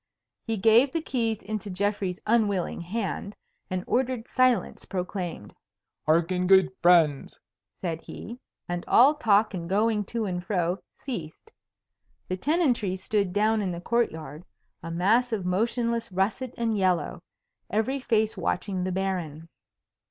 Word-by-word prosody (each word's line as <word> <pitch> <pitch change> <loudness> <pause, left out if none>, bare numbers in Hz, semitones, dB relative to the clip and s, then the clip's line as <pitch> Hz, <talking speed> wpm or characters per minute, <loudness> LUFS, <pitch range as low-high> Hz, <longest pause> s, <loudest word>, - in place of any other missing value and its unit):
He 225 -1 -1
gave 225 +7 +5
the 330 - +1
keys 230 -8 -1
into 210 0 -4
Geoffrey's 195 -1 -1
unwilling 210 -7 +1
hand, 200 +2 -4 0.3
and 185 -1 -2
ordered 250 -2 -1
silence 255 -2 +1
proclaimed. 180 - -5 0.5
"Hearken, 170 +3 +2
good 190 -1 +6
friends!" 165 -5 +4 0.4
said 165 -3 -3
he, 235 +3 -9 0.3
and 175 0 -3
all 270 +5 +6
talk 215 -8 +3
and 170 -2 -5
going 210 +1 +1
to 230 +2 -2
and 180 -2 -3
fro 180 -2 -1 0.2
ceased. 225 - -7 0.8
The 185 - 0
tenantry 250 - +1
stood 200 0 -1
down 215 +3 +2
in 190 -3 -1
the 170 - -5
court 235 +6 +1
yard, 155 0 -9 0.4
a 165 - -7
mass 215 +9 +2
of 205 -5 -2
motionless 230 +4 0
russet 215 +7 -1
and 230 -2 0
yellow, 185 -2 0 0.5
every 225 +7 0
face 220 -4 +1
watching 190 -3 -2
the 185 - -2
Baron. 175 -4 -3
200 Hz, 135 wpm, -26 LUFS, 180-230 Hz, 0.8 s, good